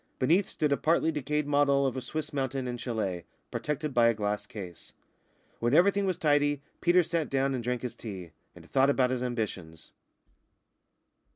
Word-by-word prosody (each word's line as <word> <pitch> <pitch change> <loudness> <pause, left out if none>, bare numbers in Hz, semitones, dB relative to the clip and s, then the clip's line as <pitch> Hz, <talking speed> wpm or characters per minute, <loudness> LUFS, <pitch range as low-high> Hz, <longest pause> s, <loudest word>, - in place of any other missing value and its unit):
Beneath 170 +9 +2
stood 150 -2 -1
a 140 - +3
partly 160 +3 +2
decayed 150 0 -1
model 140 -1 +3
of 135 - -1
a 130 - -3
Swiss 155 +3 -4
mountain 135 -2 -2
and 120 -1 -4
châlet, 105 -8 -3 0.3
protected 150 -1 -3
by 120 -1 +5
a 115 - +3
glass 105 -1 -2
case. 90 -5 -9 0.7
When 120 +4 +2
everything 200 +3 +4
was 185 - 0
tidy 145 -2 +2 0.2
Peters 175 -1 +4
sat 165 -3 0
down 135 0 +1
and 125 -2 -3
drank 125 0 -2
his 125 - -4
tea, 95 -7 -8 0.2
and - - -14
thought 135 +1 +3
about 130 -2 +2
his 130 -1 -1
ambitions. 100 -10 -4
135 Hz, 175 wpm, -29 LUFS, 115-150 Hz, 0.7 s, by